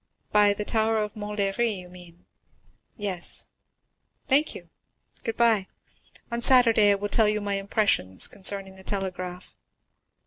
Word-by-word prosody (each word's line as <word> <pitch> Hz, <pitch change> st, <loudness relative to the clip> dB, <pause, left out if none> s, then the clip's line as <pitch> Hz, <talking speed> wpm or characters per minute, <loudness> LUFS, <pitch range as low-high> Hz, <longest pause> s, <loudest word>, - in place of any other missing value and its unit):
"By 205 Hz, -1 st, +4 dB
the 210 Hz, -, -4 dB
tower 220 Hz, 0 st, 0 dB
of 210 Hz, -1 st, -3 dB
Montlhéry, 210 Hz, +1 st, -2 dB
you 180 Hz, -1 st, -11 dB
mean?" 180 Hz, -1 st, -16 dB, 0.7 s
"Yes." 195 Hz, -5 st, -1 dB, 0.8 s
"Thank 290 Hz, +3 st, +2 dB
you. -, -, -12 dB, 0.5 s
Good 225 Hz, -, -4 dB
bye. 225 Hz, -5 st, +2 dB, 0.6 s
On 235 Hz, 0 st, -3 dB
Saturday 235 Hz, -5 st, +6 dB
I 200 Hz, -, +4 dB
will 205 Hz, +1 st, -4 dB
tell 215 Hz, +1 st, +3 dB
you 210 Hz, 0 st, -1 dB
my 205 Hz, -1 st, -4 dB
impressions 195 Hz, -, +2 dB
concerning 195 Hz, -1 st, -1 dB
the 190 Hz, -, -15 dB
telegraph." 185 Hz, -2 st, -6 dB
205 Hz, 135 wpm, -25 LUFS, 190-220 Hz, 0.8 s, Saturday